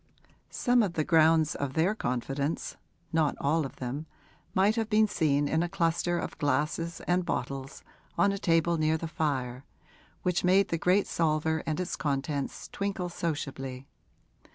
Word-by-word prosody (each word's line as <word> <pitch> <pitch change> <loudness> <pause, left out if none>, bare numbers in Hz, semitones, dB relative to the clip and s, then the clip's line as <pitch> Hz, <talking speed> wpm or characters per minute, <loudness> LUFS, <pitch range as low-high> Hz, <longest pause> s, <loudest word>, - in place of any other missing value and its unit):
Some 245 0 +2
of 195 -6 0
the 155 - 0
grounds 160 -1 +4
of 140 -2 -3
their 170 +7 +2
confidence 135 - -2 0.4
not 160 -3 +2
all 150 +1 +1
of - - -16
them 135 +5 -5 0.5
might 200 +3 +4
have 225 -2 -1
been 215 0 +4
seen 145 -6 +1
in 160 +2 +1
a 175 - -1
cluster 175 -1 0
of - - -5
glasses 150 +4 0
and 180 +1 +1
bottles 135 -2 -4 0.3
on 185 +4 +4
a 200 - -3
table 165 -1 +2
near 155 +1 +2
the 165 - -4
fire, 135 -6 -2 0.6
which 180 -2 +1
made 190 +2 +4
the 165 - -1
great 185 +4 +3
salver 160 -1 0
and 155 +1 -1
its 180 - -2
contents 140 -1 -2
twinkle 195 -3 -3
sociably. 135 -6 -4
160 Hz, 155 wpm, -29 LUFS, 145-175 Hz, 0.6 s, grounds